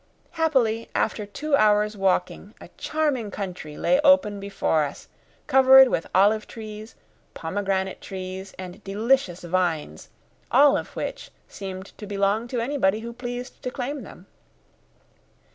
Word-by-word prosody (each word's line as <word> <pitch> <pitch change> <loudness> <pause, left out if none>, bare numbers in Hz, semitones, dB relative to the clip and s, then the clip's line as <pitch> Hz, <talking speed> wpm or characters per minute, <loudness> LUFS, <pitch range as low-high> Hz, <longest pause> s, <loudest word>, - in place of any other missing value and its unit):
Happily, 255 -9 +1
after 210 -1 -1
two 285 +9 -1
hours' 210 -2 +3
walking, 195 -2 -1
a - - -12
charming 290 -8 -1
country 180 -6 -6
lay 270 - +2
open 280 -9 +4
before 195 -5 0
us, 145 -1 -7 0.4
covered 265 -1 +7
with 165 - -1
olive 210 +3 +4
trees, 215 0 -9 0.4
pomegranate 190 +2 -2
trees, 190 0 -7
and 185 +2 -9
delicious 210 -1 +1
vines, 165 - -2 0.4
all 280 +3 +6
of - - -4
which - - -5 0.2
seemed 190 -1 -8
to 210 - -7
belong 200 +3 0
to 245 0 -3
anybody 230 -5 +1
who 235 +1 -7
pleased 245 +1 -7
to - - -3
claim 270 +2 -4
them. 190 -3 -12
210 Hz, 130 wpm, -24 LUFS, 190-250 Hz, 0.4 s, covered